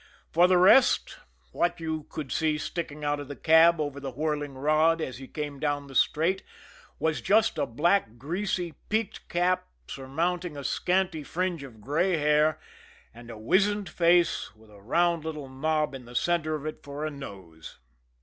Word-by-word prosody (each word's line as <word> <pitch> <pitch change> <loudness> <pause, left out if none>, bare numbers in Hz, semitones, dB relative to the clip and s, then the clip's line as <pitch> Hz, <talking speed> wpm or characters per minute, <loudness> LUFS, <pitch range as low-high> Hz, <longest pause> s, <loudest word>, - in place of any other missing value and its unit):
For 175 +2 +5
the 185 0 +4
rest, 200 +9 +5 0.3
what 175 0 0
you 160 -2 -4
could 150 -4 -6
see 155 -1 +1
sticking 150 -2 -5
out 145 0 0
of 145 - -7
the 145 - -7
cab 165 +2 +5
over 145 -2 -3
the 135 -1 -5
whirling 145 +1 -3
rod 155 +4 +3
as 130 -6 -5
he 135 - -9
came 145 -2 -5
down 145 -1 -1
the 135 - -12
straight, 165 +8 +2 0.6
was 160 -1 -1
just 210 -5 +2
a 145 - 0
black, 145 - +1
greasy 175 - -3 0.2
peaked 220 -1 -2
cap 180 +1 +1 0.2
surmounting 165 +5 -3
a 140 - -6
scanty 180 +1 0
fringe 175 +2 -2
of 120 -6 -11
gray 165 - +1
hair, 150 +1 +2 0.5
and 120 +1 -13
a 115 - -8
wizened 195 - +1
face, 170 -8 +2
with 110 0 -20
a 100 -1 -16
round 170 +8 +1
little 155 -3 -5
knob 155 +3 -1
in 130 -2 -8
the 120 +1 -12
center 155 +1 +1
of 150 -1 -7
it 155 - -5
for 145 +2 -6
a 155 - -3
nose. 95 - -10
155 Hz, 175 wpm, -27 LUFS, 140-175 Hz, 0.6 s, For